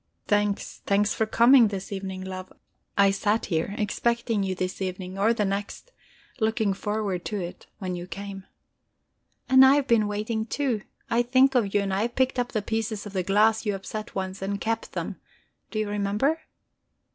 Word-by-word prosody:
Thanks, 205 -1 0
thanks 205 +1 +3
for 220 - 0
coming 235 +2 +6
this 195 -1 -5
evening, 190 -1 -4
love. 185 0 -7 0.5
I 200 -1 +6
sat 210 +3 0
here, 170 +3 -1
expecting 230 +1 0
you 190 -1 -1
this 185 +1 -3
evening, 185 0 -4
or 215 +3 +4
the 215 -3 +1
next, 200 - -4 0.5
looking 220 -2 +1
forward 205 -2 -2
to 210 - -2
it, 175 -1 -7
when 185 -2 -4
you 175 0 -6
came." 195 0 -7 1.0
"And 260 0 +8
I 265 +1 +7
have 285 -2 +2
been 220 -3 +4
waiting 220 +2 -2
too. 255 -5 -1 0.3
I 235 +1 +4
think 260 +3 +4
of 215 -6 +1
you, 205 - +4
and 195 -1 -2
I 195 - +1
have 235 +2 -2
picked 260 -1 +1
up 245 0 -1
the 215 -3 -1
pieces 220 -1 -2
of 205 - -8
the 190 - 0
glass 210 +4 +3
you 205 -3 0
upset 215 +3 -6
once, 190 0 -4
and 200 +1 -2
kept 225 +1 -2
them - - -4 0.5
do 220 - -5
you 215 -1 0
remember? 210 +10 0
205 Hz, 185 wpm, -26 LUFS, 195-225 Hz, 1.0 s, And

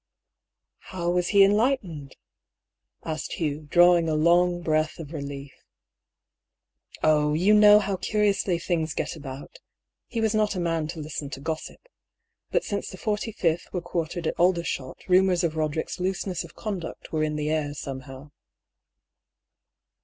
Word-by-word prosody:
" - - -61
How 175 -2 -1
was 180 0 +1
he 200 -1 +6
enlightened? 195 - +1 0.5
" - - -49
asked 160 -1 -4
Hugh, 150 -2 -3
drawing 175 -1 +5
a 155 - +1
long 175 +2 +3
breath 155 -1 0
of 160 -1 -9
relief. 140 -2 -6 0.7
" - - -25
Oh! 150 -1 +3
you 185 +6 +4
know 210 0 +8
how 200 -2 0
curiously 200 -2 +1
things 165 -2 -2
get - - -3
about. 140 - -9 0.5
He 230 - -4
was 220 -1 +1
not 215 -1 +1
a - - -2
man 165 -3 -1
to 165 +1 -7
listen 150 -1 -5
to 135 - -7
gossip. 160 +2 -5 0.7
But - - +1
since 205 - -3
the 185 - -9
45th 205 -5 -1
were 180 - 0
quartered 170 0 -3
at - - -2
Aldershot 170 -7 0
rumours 185 -1 +4
of 160 -2 0
Roderick's 155 +2 -2
looseness 185 -1 -2
of - - -13
conduct 195 -7 -6
were 155 - 0
in 155 0 0
the 150 0 -1
air 150 -2 -1
somehow." 135 0 -8
170 Hz, 155 wpm, -26 LUFS, 155-185 Hz, 0.7 s, know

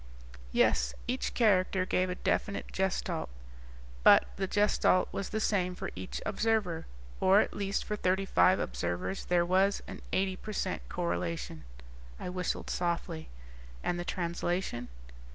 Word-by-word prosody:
"Yes, - - +2
each 130 - -2
character 190 -4 +3
gave 185 0 +1
a 180 - -2
definite 200 +2 -1
Gestalt. 190 - -1 0.7
But, - - +7
the 195 -1 -1
Gestalt 205 -2 +3
was 195 - -3
the 220 - -1
same 185 -4 +1
for - - -5
each 95 0 -5
observer. 210 -6 0 0.3
Or 190 +2 +6
at - - +1
least 200 -1 -1
for 210 - -2
thirty 190 -1 +1
five 90 - +4
observers 85 - -2
there 175 -1 +3
was 190 +3 +2
an - - -8
eighty 190 0 +1
per 215 - -7
cent 190 -2 -2
correlation." 170 - -3 0.5
I - - -4
whistled 180 0 -2
softly. 170 -2 -2 0.5
"And 175 - -1
the - - -2
translation?" 175 -7 -2
185 Hz, 140 wpm, -31 LUFS, 170-195 Hz, 0.7 s, But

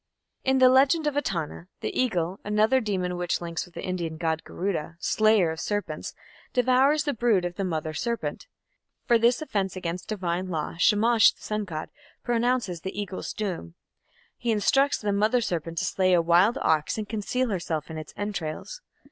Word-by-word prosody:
In 265 0 +2
the 260 -1 +7
"Legend 270 +5 +4
of 295 -2 0
Etana" 175 - -3
the - - -3
Eagle, 185 -7 0
another 215 +5 +3
demon 185 -5 -2
which 175 -1 -1
links 170 0 -4
with 175 - -20
the - - -6
Indian 170 -3 -3
Garuda, 165 +1 -2
slayer 215 -3 +3
of 160 - -6
serpents, 205 -1 -3 0.4
devours 260 +4 +3
the 290 -2 -1
brood 220 -6 +2
of 175 - -3
the 195 - -2
Mother 160 -3 -2
Serpent. 235 - -3 0.6
For 235 -2 +4
this 240 +5 +3
offence 195 -10 -2
against 175 -1 -4
divine 185 -3 -2
law, 160 -4 -3
Shamash, 220 +4 +5
the - - -26
sun 210 -1 -2
god, 155 -4 -5 0.3
pronounces 240 -7 0
the 190 +3 -5
Eagle's 195 -2 -4
doom. 180 - -4 0.6
He 240 - -3
instructs 270 +7 +3
the 205 -2 -1
Mother 215 +5 +3
Serpent 165 -6 -3
to - - 0
slay 185 -1 +2
a 175 - +5
wild 175 +7 +4
ox 155 +3 +1
and 215 -1 -4
conceal 230 +4 -1
herself 165 -6 -3
in 160 - -5
its 155 - -9
entrails. 205 - -4
200 Hz, 175 wpm, -26 LUFS, 170-235 Hz, 0.6 s, the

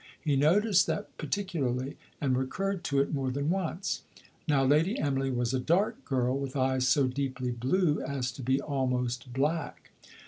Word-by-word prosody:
He 150 -3 0
noticed 180 +7 +4
that 205 - -3
particularly, 140 -10 -2 0.2
and 135 -3 +1
recurred 185 +9 -2
to 140 -1 +1
it 140 - -2
more 135 -2 0
than 140 +4 -1
once. 185 0 -2 0.5
Now 140 -3 +3
Lady 155 - +3
Emily 135 -2 0
was 120 -1 0
a 130 - +1
dark 190 - +1
girl, 130 -2 +1
with 135 -1 -5
eyes 130 -1 +2
so 140 0 +4
deeply 130 -1 -2
blue 145 +7 +1
as 130 -3 -2
to 135 - -9
be 130 +2 +1
almost 125 -3 -1
black. 145 +5 -2
135 Hz, 165 wpm, -29 LUFS, 130-160 Hz, 0.5 s, noticed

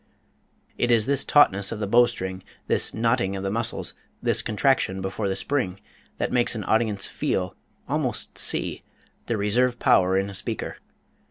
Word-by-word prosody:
It 120 - +1
is 115 -3 +3
this 140 +1 +6
tautness 100 -10 +3
of 115 - -5
the 105 - -2
bow 120 +4 +4
string, 95 -5 -5 0.2
this - - +3
knotting 115 -4 0
of 95 - -5
the 95 - -2
muscles, 115 +2 -2 0.3
this - - +2
contraction 110 -4 0
before 95 +2 -3
the 95 - -2
spring, 100 -4 -2 0.4
that - - -2
makes 120 -1 +1
an 110 - -4
audience 110 -2 +1
feel 90 -1 -3 0.3
almost - - -3
see - - 0 0.5
the 115 - -1
reserve 120 +5 +1
power 95 -3 +3
in 95 +1 0
a 100 - -8
speaker. 95 - -4
105 Hz, 165 wpm, -24 LUFS, 95-120 Hz, 0.5 s, this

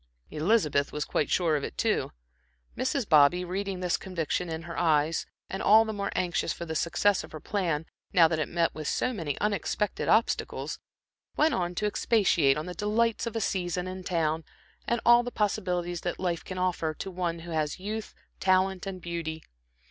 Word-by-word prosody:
Elizabeth 155 -4 +2
was 150 - -2
quite 150 - 0
sure 170 -4 +2
of 145 - -1
it, - - -6
too. - - +1 0.6
Mrs. 260 -2 -1
Bobby, 155 +3 +5
reading 190 +1 -3
this 180 -1 +1
conviction 180 -1 -2
in 160 0 -4
her 170 0 -7
eyes, 160 -1 +2 0.2
and 195 - -4
all 220 +2 +6
the 220 - -3
more 200 -1 -3
anxious 175 -1 0
for 170 - -5
the 160 - -4
success 180 +5 +2
of - - -12
her 155 - -6
plan, 165 -5 -1 0.3
now 170 -2 +6
that 160 -1 -1
it 155 - -1
met 170 -1 +1
with 155 -1 -5
so 255 - 0
many 160 - -3
unexpected 210 0 -1
obstacles, 220 +1 +1 0.6
went 310 -1 +4
on 175 -4 -1
to 210 - -1
expatiate 190 -10 +3
on 155 - -3
the 180 - -5
delights 220 +3 0
of 230 - -5
a - - +1
season 180 -2 -1
in 185 0 -6
town, 165 -2 0 0.4
and 235 - +1
all 240 0 +7
the 245 - -4
possibilities 180 -6 -1
that 175 - -3
life 175 -3 -1
can 185 - -7
offer, 175 -4 -1
to 195 - -6
one 175 -2 -2
who 170 +1 -9
has 155 +1 -1
youth, 215 +2 -5 0.2
talent 190 0 +2
and 185 -2 -6
beauty. 165 -2 -4
180 Hz, 190 wpm, -28 LUFS, 165-200 Hz, 0.6 s, all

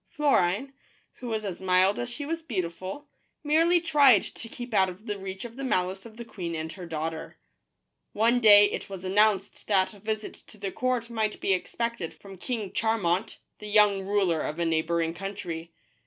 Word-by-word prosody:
Florine, 270 -3 +1 0.5
who 250 - -7
was 220 -2 -2
as 190 -3 -5
mild 185 +2 +3
as 245 - -3
she 265 +4 -5
was 330 +2 -3
beautiful, 190 - -5 0.4
merely 330 +4 +4
tried 290 - +5
to 230 - -7
keep 245 0 -8
out 190 -2 +4
of 185 +4 -11
the 205 -3 -4
reach 190 +2 -6
of 235 +1 -10
the 275 - -5
malice 190 -4 -1
of 220 -1 -16
the 235 - -7
queen 175 -7 -5
and 160 0 -4
her 180 0 -9
daughter. 160 0 -4 0.7
One 230 +3 +3
day 205 -3 +8
it - - -5
was 190 -1 -7
announced 200 0 +1
that 190 -2 +2
a 205 - -15
visit 215 +1 -4
to - - -13
the 200 -1 -4
court 245 0 -1
might 220 -2 -1
be 195 - +1
expected 230 -1 -3
from 195 -2 -13
King 215 -3 -3
Charmant, 215 -2 0 0.2
the 210 - -8
young 205 -2 +4
ruler 190 -5 +1
of 150 - -3
a 170 - 0
neighboring 165 0 0
country. 170 -3 -6
205 Hz, 185 wpm, -27 LUFS, 185-235 Hz, 0.7 s, day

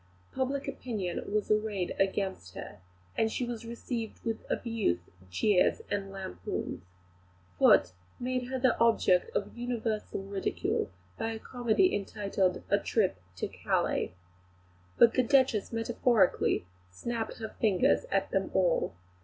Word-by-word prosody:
Public 270 +1 -1
opinion 200 -7 -3
was 210 0 0
arrayed 210 -4 0
against 190 - -1
her; 105 - -8 0.5
she 245 +3 -2
was 235 -1 -5
received 235 -1 -4
with 225 -1 -2
abuse, 225 - 0 0.3
jeers, 180 - +3
and 195 -1 -1
lampoons. 190 - -5 0.8
Foote 90 - +6 0.3
made 250 0 -1
her 260 +1 -2
the 255 0 +3
object 225 - +4
of - - -2
universal 230 -4 -2
ridicule 195 0 -1 0.3
by 225 - -1
a - - -4
comedy 245 - +2
entitled, 195 -2 -1
"A 200 - +5
Trip 200 - +1 0.2
to 90 - -2
Calais." - - -1 0.8
But 235 -1 +7
the 255 - +4
Duchess 255 -4 +3
metaphorically 225 - +2 0.2
snapped 225 - -4
her 220 -1 -5
fingers 200 -5 +3
at 195 - 0
them 195 0 0
all. 175 - +2
220 Hz, 125 wpm, -30 LUFS, 195-240 Hz, 0.8 s, But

